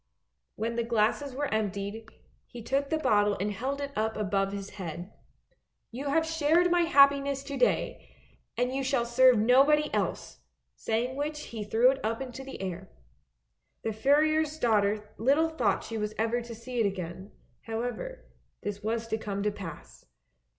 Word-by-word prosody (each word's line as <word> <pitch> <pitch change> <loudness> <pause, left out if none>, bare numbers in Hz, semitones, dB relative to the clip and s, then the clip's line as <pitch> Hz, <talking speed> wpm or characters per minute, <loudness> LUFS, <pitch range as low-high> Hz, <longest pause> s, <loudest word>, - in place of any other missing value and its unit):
When 230 +2 -3
the 235 - +1
glasses 230 +4 0
were 285 -3 -2
emptied, 210 +1 -3 0.4
he 240 -2 -10
took 275 +4 0
the 315 - +1
bottle 205 -8 +2
and 205 +2 -1
held 265 +7 -3
it 280 0 -4
up 220 +1 -1
above 195 -1 0
his 200 0 -6
head. 175 +2 -6 0.4
" - - -45
You 265 +5 -5
have 320 +3 +2
shared 325 +2 +2
my 350 0 +4
happiness 280 -3 +4
to 280 0 -6
day, - - 0 0.5
and 245 +1 0
you 270 0 -1
shall 265 -3 +1
serve 250 +1 +5
nobody 275 +7 +4
else, - - -2 0.4
saying 240 +4 -2
which 300 +1 -2
he 225 -6 -6
threw 230 +5 +4
it 270 - -6
up 225 +1 -1
into 265 0 -6
the 270 - -8
air. 185 0 -5 0.9
The 220 - -1
furrier's 305 +6 +2
daughter 210 -4 +1
little 285 +8 +3
thought 320 - 0
she 225 -1 -5
was 210 0 -3
ever 230 +2 0
to 235 -1 -8
see 240 +2 -5
it 220 - +3
again; 185 +1 -6 0.4
however 245 - -4 0.4
this 205 0 -4
was 225 +2 -2
to 220 0 -1
come 200 -2 -3
to 210 - +1
pass. 185 -6 -9
235 Hz, 170 wpm, -29 LUFS, 210-280 Hz, 0.9 s, serve